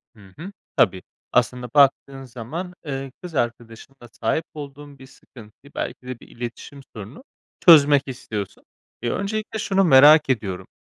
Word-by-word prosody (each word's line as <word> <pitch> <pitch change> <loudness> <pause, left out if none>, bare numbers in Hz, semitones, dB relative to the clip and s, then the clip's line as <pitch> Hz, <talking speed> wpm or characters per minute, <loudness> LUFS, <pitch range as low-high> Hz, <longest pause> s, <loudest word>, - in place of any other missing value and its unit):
Hı 100 -3 -18
hı. 185 +5 -8 0.3
Tabii. 95 -2 +3 0.3
Aslında 125 -1 0
baktığın 140 -1 +3
zaman, 135 +9 -7
eee, 135 -1 -5
kız 175 -4 -8
arkadaşınla 120 +1 -5
sahip 155 +8 -2
olduğun 145 -1 -10
bir 130 - -13
sıkıntıyı, 125 +2 -17
belki 125 - -5
de 130 -2 -6
bir - - -16
iletişim 120 +4 -9
sorununu, 110 - -10 0.4
çözmek 145 -5 +7
istiyorsun. 110 -6 -7 0.4
Eee, 120 - -2
öncelikle 215 +2 -3
şunu 195 -1 +1
merak 150 -1 +7
ediyorum: 95 -7 -2
135 Hz, 140 wpm, -22 LUFS, 120-150 Hz, 0.4 s, çözmek